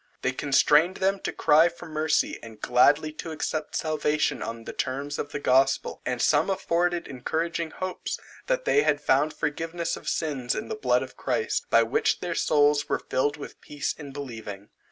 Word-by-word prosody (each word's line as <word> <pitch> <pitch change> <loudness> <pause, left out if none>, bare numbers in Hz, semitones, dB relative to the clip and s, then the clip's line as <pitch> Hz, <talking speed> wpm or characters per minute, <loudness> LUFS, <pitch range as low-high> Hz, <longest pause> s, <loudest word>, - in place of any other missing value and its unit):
This 130 - +1
constrained 150 +6 +3
them 195 +1 +1
to - - -3
cry 160 +3 +4
for 170 - -12
mercy, 155 -1 0
and 110 -2 -11
gladly 145 +7 +3
to 165 - -7
accept 155 -1 -3
salvation 155 -1 0
on 115 0 -5
the - - -7
terms 140 +2 -3
of 145 - -4
the - - -3
gospel: 135 0 +2
and 125 -1 -1
some 150 +7 +3
afforded 175 -2 0
encouraging 160 +5 -2
hopes, 185 +2 -4 0.3
that - - 0
they 430 - +4
had - - +2
found 155 - +2
forgiveness 165 +3 -3
of - - -5
sins 135 -6 -1
in 215 - -5
the - - -2
blood 430 - +1
of - - -10
Christ, 450 - -1
by - - +5
which 445 0 +1
their 175 -1 -3
souls 145 -2 +2
were - - +2
filled 145 +3 -1
with 145 - -10
peace 145 -1 -3
in 145 -3 -10
believing. 110 -8 -8
150 Hz, 180 wpm, -26 LUFS, 140-170 Hz, 0.3 s, by